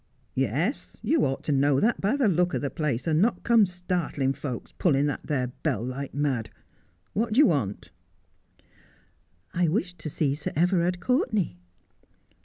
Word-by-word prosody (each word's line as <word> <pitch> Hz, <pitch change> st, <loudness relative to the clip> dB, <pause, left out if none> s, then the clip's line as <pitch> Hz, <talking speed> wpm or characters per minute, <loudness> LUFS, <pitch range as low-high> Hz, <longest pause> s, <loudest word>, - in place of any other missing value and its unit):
' -, -, -41 dB
Yes. 160 Hz, -, -2 dB
You 275 Hz, +5 st, +2 dB
ought 135 Hz, 0 st, -2 dB
to -, -, -1 dB
know 140 Hz, 0 st, +3 dB
that 235 Hz, +8 st, +1 dB
by 205 Hz, +7 st, +2 dB
the 275 Hz, -5 st, +2 dB
look 180 Hz, -1 st, +2 dB
o' -, -, +2 dB
the 140 Hz, -, -3 dB
place, 145 Hz, -7 st, -2 dB
and 160 Hz, 0 st, +2 dB
not 230 Hz, +4 st, +1 dB
come 230 Hz, -4 st, +5 dB
startling 175 Hz, -6 st, -1 dB
folks, 130 Hz, -4 st, -6 dB
pulling 145 Hz, -5 st, +2 dB
that 145 Hz, -, -1 dB
there 130 Hz, -4 st, -1 dB
bell 120 Hz, -8 st, -1 dB
like 130 Hz, +2 st, -5 dB
mad. 135 Hz, -6 st, -1 dB, 0.6 s
What 220 Hz, +2 st, 0 dB
do -, -, -1 dB
you 295 Hz, -, +8 dB
want? 105 Hz, -, -1 dB, 0.5 s
' -, -, -33 dB
' 90 Hz, +1 st, -40 dB
I 175 Hz, 0 st, +2 dB
wished 180 Hz, 0 st, -1 dB
to 155 Hz, -, -5 dB
see 140 Hz, -1 st, 0 dB
Sir 150 Hz, +1 st, -5 dB
Everard 175 Hz, +2 st, +2 dB
Courtenay.' 215 Hz, -, +1 dB
155 Hz, 180 wpm, -26 LUFS, 135-190 Hz, 0.6 s, you